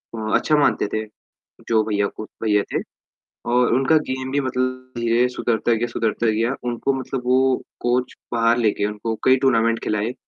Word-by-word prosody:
अ, 110 Hz, -1 st, -3 dB
अच्छा 155 Hz, -, +2 dB
मानते 145 Hz, -, +2 dB
थे 110 Hz, 0 st, -1 dB, 0.6 s
जो 110 Hz, -1 st, +3 dB
भईया 105 Hz, -2 st, 0 dB
को 110 Hz, -, -5 dB, 0.2 s
भईया 105 Hz, -2 st, +3 dB
थे -, -, 0 dB, 0.7 s
और 125 Hz, -1 st, +3 dB
उनका 135 Hz, +5 st, +3 dB
गेम 130 Hz, 0 st, -3 dB
भी 140 Hz, -, +1 dB
मतलब 130 Hz, 0 st, -3 dB
धीरे 120 Hz, +1 st, +2 dB
सुधरता 120 Hz, -1 st, -1 dB
गया, 115 Hz, +2 st, 0 dB
सुधरता 115 Hz, 0 st, -1 dB
गया 115 Hz, +4 st, +1 dB
उनको 120 Hz, +3 st, -1 dB
मतलब 130 Hz, 0 st, -4 dB
वो 130 Hz, +1 st, +3 dB, 0.3 s
कोच 125 Hz, +1 st, 0 dB, 0.2 s
बाहर 115 Hz, 0 st, +3 dB
लेके 110 Hz, -3 st, +1 dB
उनको 105 Hz, +2 st, -3 dB
कई 130 Hz, -, +6 dB
टूर्नामेंट 115 Hz, -3 st, +3 dB
खिलाए, 105 Hz, +3 st, -1 dB
120 Hz, 170 wpm, -22 LUFS, 110-130 Hz, 0.7 s, कई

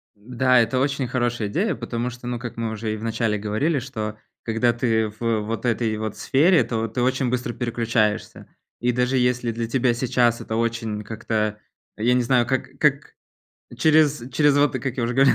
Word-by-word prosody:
Да, 125 Hz, +4 st, +2 dB
это 115 Hz, +2 st, +1 dB
очень 140 Hz, -1 st, 0 dB
хорошая 120 Hz, -3 st, -1 dB
идея, 185 Hz, -, 0 dB
потому 120 Hz, +1 st, -3 dB
что, 125 Hz, 0 st, -9 dB
ну, 120 Hz, -1 st, -3 dB
как 120 Hz, 0 st, -7 dB
мы 115 Hz, -1 st, -2 dB
уже 110 Hz, 0 st, -3 dB
и -, -, -4 dB
в 105 Hz, -, -9 dB
начале 115 Hz, -1 st, 0 dB
говорили, 110 Hz, +10 st, 0 dB
что 110 Hz, -4 st, -5 dB, 0.3 s
когда 115 Hz, +1 st, +1 dB
ты 115 Hz, -2 st, +1 dB
в 110 Hz, +1 st, -1 dB
вот 115 Hz, +3 st, -4 dB
этой 115 Hz, -2 st, 0 dB
вот 110 Hz, -1 st, -4 dB
сфере, 160 Hz, +6 st, +4 dB
то 115 Hz, -1 st, -2 dB
ты 115 Hz, +3 st, -3 dB
очень 130 Hz, 0 st, +1 dB
быстро 120 Hz, -1 st, -2 dB
переключаешься. 115 Hz, -3 st, -1 dB, 0.3 s
И 125 Hz, +1 st, +2 dB
даже 125 Hz, +2 st, +1 dB
если 125 Hz, -1 st, +1 dB
для 115 Hz, 0 st, -3 dB
тебя 125 Hz, 0 st, +2 dB
сейчас 120 Hz, -1 st, +1 dB
это 110 Hz, -, -4 dB
очень 115 Hz, -2 st, -2 dB
как-то, 110 Hz, 0 st, -2 dB, 0.4 s
я 115 Hz, +3 st, +2 dB
не 125 Hz, -, +3 dB
знаю, 120 Hz, 0 st, +3 dB
как 130 Hz, 0 st, -2 dB
как, 145 Hz, -1 st, +1 dB, 0.6 s
через 155 Hz, -4 st, +3 dB
через 145 Hz, 0 st, +3 dB
вот, 145 Hz, 0 st, +3 dB
как 130 Hz, -3 st, -3 dB
я 125 Hz, -, -1 dB
уже 120 Hz, +1 st, -1 dB
говорил, 135 Hz, +1 st, +5 dB
120 Hz, 190 wpm, -23 LUFS, 110-130 Hz, 0.6 s, говорил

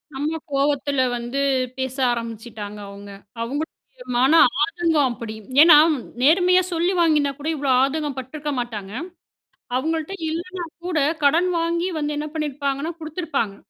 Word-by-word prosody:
நம்ம 295 Hz, +4 st, -2 dB, 0.2 s
கோவத்தில 280 Hz, -1 st, +1 dB, 0.2 s
வந்து 240 Hz, +3 st, -4 dB, 0.4 s
பேச 260 Hz, 0 st, -3 dB, 0.2 s
ஆரம்பிச்சுட்டாங்க 225 Hz, -3 st, -6 dB
அவுங்க. 200 Hz, 0 st, -10 dB, 0.3 s
அவுங்களுடைய 285 Hz, +7 st, -3 dB, 0.4 s
மன 265 Hz, +4 st, +4 dB, 0.3 s
ஆதங்கம் 320 Hz, -4 st, +1 dB
அப்படி. 230 Hz, -2 st, -6 dB, 0.3 s
ஏன்னா, 320 Hz, -2 st, +9 dB, 0.4 s
நேர்மையா 360 Hz, +5 st, +5 dB
சொல்லி 345 Hz, +3 st, +1 dB
வாங்கினா 300 Hz, -4 st, +3 dB
கூட 290 Hz, -, -5 dB
இவ்வளோ 280 Hz, -2 st, 0 dB
ஆதங்கம் 290 Hz, 0 st, -1 dB
பட்டுருக்க 295 Hz, +3 st, -5 dB
மாட்டாங்க. 210 Hz, -5 st, -5 dB, 0.9 s
அவுங்கள்ட்ட 320 Hz, +5 st, -2 dB, 0.2 s
இல்லைன்னா 350 Hz, +2 st, -4 dB, 0.2 s
கூட, 360 Hz, -3 st, -1 dB, 0.3 s
கடன் 335 Hz, +6 st, +4 dB
வாங்கி 340 Hz, +2 st, 0 dB
வந்து 295 Hz, -1 st, -2 dB
என்ன 300 Hz, +1 st, -3 dB
பண்ணிருப்பாங்கன்னா, 285 Hz, +1 st, -2 dB
குடுத்துருப்பாங்க. 310 Hz, -, -3 dB
290 Hz, 125 wpm, -22 LUFS, 260-325 Hz, 0.9 s, ஏன்னா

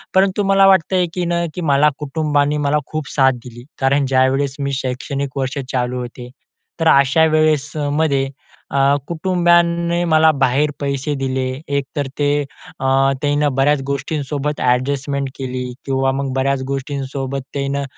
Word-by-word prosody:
परंतु 195 Hz, +1 st, +3 dB
मला 195 Hz, 0 st, +6 dB
वाटतं 190 Hz, -1 st, +3 dB
आहे 180 Hz, -, +3 dB
की 180 Hz, -1 st, -2 dB
ना, 170 Hz, 0 st, 0 dB
की 180 Hz, -, -4 dB
मला 145 Hz, +2 st, +5 dB
कुटुंबाने 150 Hz, 0 st, 0 dB
मला 150 Hz, -, +2 dB
खूप 155 Hz, -2 st, -4 dB
साथ 135 Hz, -2 st, +5 dB
दिली. 120 Hz, 0 st, -10 dB, 0.2 s
कारण 140 Hz, +1 st, +2 dB
ज्यावेळेस 135 Hz, +1 st, +1 dB
मी 140 Hz, 0 st, -2 dB
शैक्षणिक 135 Hz, +2 st, -4 dB
वर्ष 135 Hz, +1 st, -2 dB
चालू 125 Hz, 0 st, -1 dB
होते 125 Hz, 0 st, -8 dB, 0.5 s
तर 165 Hz, -, +1 dB
अशा 140 Hz, +3 st, +5 dB
वेळेसमध्ये 150 Hz, -2 st, +1 dB, 0.4 s
अ, 140 Hz, -, -1 dB, 0.3 s
कुटुंबाने 170 Hz, 0 st, +2 dB
मला 160 Hz, 0 st, +6 dB
बाहेर 135 Hz, +3 st, +2 dB
पैसे 140 Hz, +1 st, -2 dB
दिले. 130 Hz, -1 st, -2 dB, 0.3 s
एकतर 140 Hz, 0 st, -3 dB
ते 145 Hz, 0 st, +2 dB, 0.5 s
अ, 135 Hz, -, -3 dB, 0.4 s
त्यांना 145 Hz, 0 st, +1 dB
बऱ्याच 140 Hz, +1 st, +3 dB
गोष्टींसोबत 145 Hz, +1 st, -3 dB
ॲडजस्टमेंट 135 Hz, +2 st, 0 dB
केली 130 Hz, -1 st, -4 dB, 0.2 s
किंवा 135 Hz, -1 st, +1 dB
मग 135 Hz, 0 st, -2 dB
बऱ्याच 135 Hz, 0 st, 0 dB
गोष्टींसोबत 135 Hz, 0 st, -3 dB
त्यांनं 140 Hz, 0 st, -2 dB
140 Hz, 140 wpm, -18 LUFS, 135-155 Hz, 0.5 s, मला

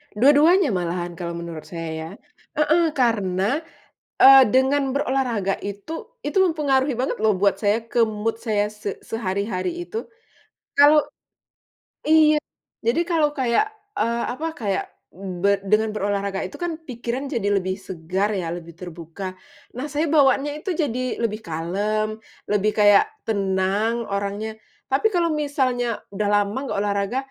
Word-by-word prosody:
Dua-duanya 290 Hz, -, +5 dB
malahan 175 Hz, -1 st, -2 dB
kalau 170 Hz, -1 st, -4 dB
menurut 170 Hz, -2 st, -7 dB
saya, 165 Hz, +1 st, -6 dB, 0.4 s
heeh, 305 Hz, +3 st, +3 dB
karena, 215 Hz, 0 st, +1 dB, 0.6 s
eee, 270 Hz, 0 st, +9 dB
dengan 265 Hz, +4 st, +3 dB
berolahraga 245 Hz, -8 st, 0 dB
itu 325 Hz, -, -7 dB
itu 390 Hz, -, 0 dB
mempengaruhi 285 Hz, -7 st, +2 dB
banget 255 Hz, +2 st, -1 dB
loh 215 Hz, -3 st, +3 dB
buat 200 Hz, +1 st, +2 dB
saya, 215 Hz, +2 st, +1 dB
ke 235 Hz, +1 st, -1 dB
mood 220 Hz, +1 st, -2 dB
saya 215 Hz, -3 st, +1 dB
se 210 Hz, -2 st, -5 dB
sehari-hari 210 Hz, -, -3 dB
itu. 445 Hz, +6 st, -6 dB, 0.7 s
Kalau 295 Hz, +1 st, +7 dB, 1.1 s
iya, 305 Hz, -1 st, +5 dB, 0.4 s
jadi 235 Hz, +9 st, +1 dB
kalau 325 Hz, -4 st, +2 dB
kayak, 255 Hz, -, +2 dB, 0.3 s
eee, 235 Hz, 0 st, 0 dB
apa 305 Hz, +5 st, -5 dB
kayak 200 Hz, -4 st, -1 dB, 0.3 s
be 195 Hz, +1 st, -1 dB
dengan 215 Hz, +2 st, +1 dB
berolahraga 200 Hz, -1 st, -1 dB
itu 185 Hz, -, -6 dB
kan 335 Hz, -2 st, -4 dB
pikiran 245 Hz, +3 st, -4 dB
jadi 205 Hz, -6 st, -1 dB
lebih 185 Hz, +1 st, -3 dB
segar 190 Hz, +3 st, -2 dB
ya, 180 Hz, -4 st, -2 dB
lebih 170 Hz, 0 st, -7 dB
terbuka. 175 Hz, +2 st, -8 dB, 0.4 s
Nah 260 Hz, -, -3 dB
saya 305 Hz, +2 st, 0 dB
bawaanya 290 Hz, -1 st, +3 dB
itu 365 Hz, +5 st, -3 dB
jadi 255 Hz, -7 st, -2 dB
lebih 220 Hz, -2 st, 0 dB
kalem, 205 Hz, +7 st, -2 dB, 0.3 s
lebih 210 Hz, 0 st, +2 dB
kayak 205 Hz, -, +6 dB, 0.2 s
tenang 200 Hz, +3 st, 0 dB
orangnya, 200 Hz, +2 st, -3 dB, 0.3 s
tapi 270 Hz, +11 st, +3 dB
kalau 340 Hz, -1 st, +2 dB
misalnya 255 Hz, -5 st, -1 dB
udah 205 Hz, +1 st, -2 dB
lama 205 Hz, +4 st, -3 dB
nggak 250 Hz, -, -3 dB
olahraga, 200 Hz, +3 st, -1 dB
215 Hz, 135 wpm, -23 LUFS, 195-270 Hz, 1.1 s, eee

